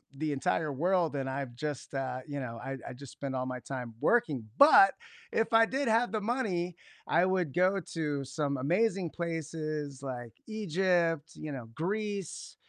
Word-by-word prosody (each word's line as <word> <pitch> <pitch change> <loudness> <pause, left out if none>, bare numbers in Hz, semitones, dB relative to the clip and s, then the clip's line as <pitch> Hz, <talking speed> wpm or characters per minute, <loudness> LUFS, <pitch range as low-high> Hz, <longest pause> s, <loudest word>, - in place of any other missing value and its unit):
the 155 +1 -1
entire 145 +2 0
world, 170 +1 +1
and 135 -1 -2
I've 130 -3 -4
just, 145 0 -5
uh, 130 -1 -2
you 145 -1 -4
know, 115 -3 -5
I 135 0 -4
I - - -5
just 135 0 -10
spend 135 -2 -4
all 130 0 -1
my 125 0 -4
time 125 -2 -6
working, 150 - +2
but 350 +7 +9 0.4
if 225 - +1
I 225 0 +7
did 270 +2 -1
have 230 +2 +3
the 215 -1 -1
money, 200 -7 -1 0.3
I 170 +2 +4
would 185 -6 +1
go 185 +2 +3
to 150 -4 -1
some 140 0 -2
amazing 180 - +1
places 155 -4 -4
like 120 -3 -5
Egypt, 175 -6 +1
you 155 -1 -6
know, 125 -4 -6
Greece, 200 +2 -3
155 Hz, 170 wpm, -31 LUFS, 135-190 Hz, 0.4 s, but